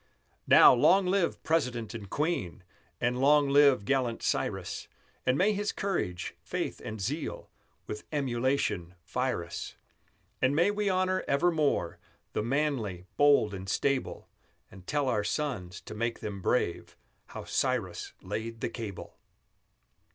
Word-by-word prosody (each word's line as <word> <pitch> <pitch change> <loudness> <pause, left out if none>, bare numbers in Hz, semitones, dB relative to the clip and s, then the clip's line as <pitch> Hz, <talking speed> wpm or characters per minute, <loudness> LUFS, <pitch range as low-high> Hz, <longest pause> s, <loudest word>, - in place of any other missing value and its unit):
Now, - - +9
long 185 +10 +5
live 185 -1 0
President 125 -9 0
and 105 -4 -8
Queen; 145 - -2 0.4
And 120 +1 0
long 145 0 +5
live 140 -6 +5
gallant 125 -2 0
Cyrus; - - -2 0.4
And 130 +1 +3
may 205 +6 +3
his 205 0 -1
courage, 90 - -2
faith, - - -4
and 110 0 -6
zeal 140 - -4 0.3
With 105 - -7
emulation 130 - -1
fire 125 -3 -1
us; 85 - -7 0.7
And 130 +2 +3
may 175 +6 +4
we 205 -1 0
honor 185 0 +1
evermore 150 - +1 0.3
The - - 0
manly, 120 -8 -1
bold, 145 -8 +4
and 95 0 -6
stable; 140 +4 -1 0.4
And 95 -1 -14
tell 145 -2 0
our 105 -5 +1
sons, 105 - -3
to - - -9
make 115 +2 -2
them 100 -2 -5
brave, 85 -5 -1 0.3
How - - -8
Cyrus - - -1
laid 115 +1 -5
the - - -1
cable! 110 -6 -7
130 Hz, 135 wpm, -29 LUFS, 105-150 Hz, 0.7 s, Now